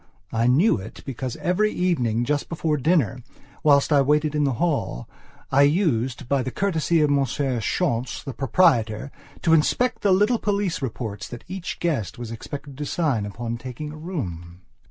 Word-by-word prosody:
I 115 +1 +1
knew 145 - +4
it 95 - -10
because 130 -2 -4
every 210 +5 +1
evening 120 -11 0
just 145 +1 -1
before 160 -2 0
dinner, 140 - +2 0.4
whilst 145 0 +4
I 140 - +6
waited 150 +2 +2
in 150 -1 +1
the 135 - +1
hall, 145 - -1 0.4
I 140 - +5
used, 140 - +1
by 140 0 +2
the 130 - -3
courtesy 165 -1 +1
of 150 -1 +3
Monsieur 135 -2 0
Schontz, 125 -2 -1
the 135 - -5
proprietor, 120 - +2 0.3
to 165 - +4
inspect 245 +11 +2
the 200 - +3
little 210 +5 +3
police 200 -5 -1
reports 110 -5 -4
that 120 - -9
each 185 0 -5
guest 150 - -1
was 120 -2 -6
expected 140 +4 -8
to 150 - -2
sign 135 -13 0
upon 115 +3 -4
taking 130 +5 -7
a - - -9
room. 90 - -6
140 Hz, 170 wpm, -24 LUFS, 120-165 Hz, 0.4 s, I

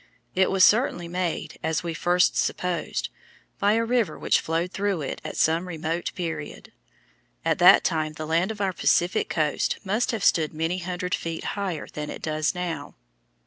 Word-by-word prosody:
It 190 0 +3
was 190 -1 +3
certainly 210 -6 +3
made, 180 -1 -3
as 160 +1 -1
we 170 - -3
at 160 - -6
first 180 +1 +3
supposed, 180 -1 -1 0.5
by 205 +1 +3
a 230 +1 +1
river 230 -8 0
which - - +2
flowed 165 +3 -2
through 195 -6 -1
it - - -5
at - - -6
some 165 +3 +2
remote 165 0 -3
period. 160 -4 -5 0.7
At - - +1
that - - +8
time 155 -1 0
the 155 0 -6
land 165 +5 +1
of 215 -2 -5
our 190 -2 0
Pacific 180 +4 +1
coast 150 -3 0
must 215 +4 0
have 225 -4 -2
stood 155 -1 +2
many 165 +3 -1
hundred 180 +1 -4
feet 165 -1 -3
higher 190 -6 -3
than 150 0 -6
it - - -8
does 155 +2 0
now. 170 -5 -4
175 Hz, 180 wpm, -25 LUFS, 160-190 Hz, 0.7 s, that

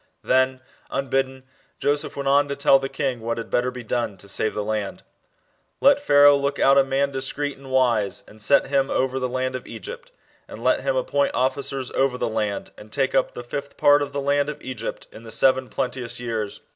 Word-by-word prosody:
* - - -47
Then, 130 0 +2 0.3
unbidden, 135 -1 -1 0.3
Joseph 145 +1 -1
went 140 -1 -4
on 140 +1 +4
to 140 - -3
tell 135 -1 +5
the 135 0 -4
kin: 135 -4 -2
what 115 +1 -2
had 115 - -6
better 125 +1 +1
be 125 -1 -8
done 115 -3 -2
to 100 - -13
save 110 +2 -2
the 105 - -1
land. 105 -1 -3 0.8
66 - - -47
Let 285 +1 +5
Pharaoh 145 - +6
look 140 0 -1
out 135 0 +5
a - - +5
man 135 +1 0
discreet 140 +2 -3
and 135 0 -13
wise, 120 -6 +2
and 110 0 -13
set 140 +7 +4
him 135 0 +1
over 130 0 0
the 130 -1 -2
land 130 0 -2
of 130 - -6
Egypt.... 485 +3 -9 0.4
And - - -10
let - - +3
him - - 0
appoint - - 0
officers 135 0 -1
over 135 -2 +1
the - - -1
land, 110 -2 -2
and 105 0 -13
take 135 +1 0
up 135 - +1
the 120 - -6
fifth 140 +3 -6
part 145 0 +5
of 145 -1 -3
the 140 0 -3
land 140 +1 +1
of 150 - -6
Egypt 125 -4 -5
in - - -12
the 115 -1 -11
seven 130 +2 +3
plenteous 125 -2 -3
years. 115 -4 -4
135 Hz, 220 wpm, -23 LUFS, 120-140 Hz, 0.8 s, Pharaoh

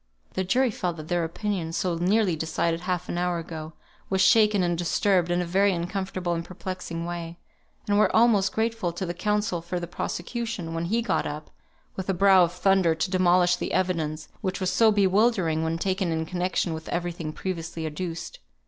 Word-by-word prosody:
The 190 - -1
jury 250 +6 +2
felt 175 -4 -3
that 155 0 -9
their 175 -1 +1
opinion 170 -1 -3
(so 180 0 0
nearly 185 +2 +2
decided 160 +1 -1
half 180 0 -2
an 175 - -2
hour 180 -1 0
ago) 160 -1 -7 0.4
was 190 - 0
shaken 210 0 +5
and 175 -1 +1
disturbed 175 +1 +1
in 175 0 +1
a - - -4
very 195 +3 +3
uncomfortable 180 0 -2
and 165 0 -2
perplexing 180 -2 -6
way, 170 -1 -5 0.5
and 205 0 +3
were - - +3
almost 215 -4 +4
grateful 225 -5 -1
to 180 +2 -3
the 175 - -3
counsel 210 -1 -1
for 175 +1 -3
the 175 - -4
prosecution, 180 +1 -4
when 165 +1 -2
he 225 +6 0
got - - 0
up, 150 +1 -7 0.4
with 190 0 -5
a 190 - +1
brow 190 0 +6
of 170 - -5
thunder, 180 -2 +3
to 160 +3 -2
demolish 180 -1 +4
the - - -4
evidence, 160 -4 -1
which 190 -2 -2
was 185 -2 0
so 225 -1 +5
bewildering 195 -5 +2
when 160 0 -1
taken 185 0 -1
in 160 0 -1
connexion 180 0 -1
with 160 0 -7
every 175 0 -1
thing 165 -2 -5
previously 165 -1 -4
adduced. 165 +2 -5
180 Hz, 195 wpm, -26 LUFS, 170-195 Hz, 0.5 s, brow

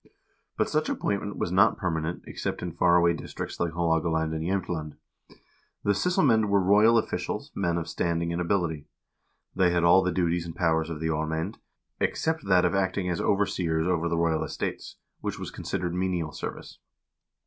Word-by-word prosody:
But - - +2
such - - 0
appointment 100 0 -2
was 85 - -2
not 100 +4 +4
per 90 -3 -1
manent 80 +1 -3
except - - -4
in 90 - -3
far 85 +1 +3
away 85 -1 +4
districts 80 - -6
like 85 -1 -1
Haalogaland 80 -1 +1
and 80 0 -3
Jsemtland. 85 -5 -2 0.9
The 100 - +2
sysselmcend 125 - +3
were 100 0 +3
royal 105 +5 +5
officials, 115 - -2
men 85 -3 0
of 85 -1 -3
standing 85 0 -1
and 85 - -1
ability. 85 -5 -1 0.7
They 90 -1 +4
had 85 0 +1
all 85 +2 +6
the 90 - 0
duties 85 -1 0
and 80 - -7
powers 80 -2 +1
of 80 -2 -5
the 80 - 0
aarmcend, 80 +5 -2 0.4
except 160 -1 -1
that 95 -2 +4
of - - +1
acting 95 -1 0
as 85 - -1
overseers 90 -5 +1
over 85 -2 0
the 85 - 0
royal 80 -1 +1
estates, 80 - -5 0.2
which - - -4
was - - -6
considered 85 -1 -3
menial 90 -3 -1
service. - - -7
85 Hz, 175 wpm, -27 LUFS, 80-95 Hz, 0.9 s, all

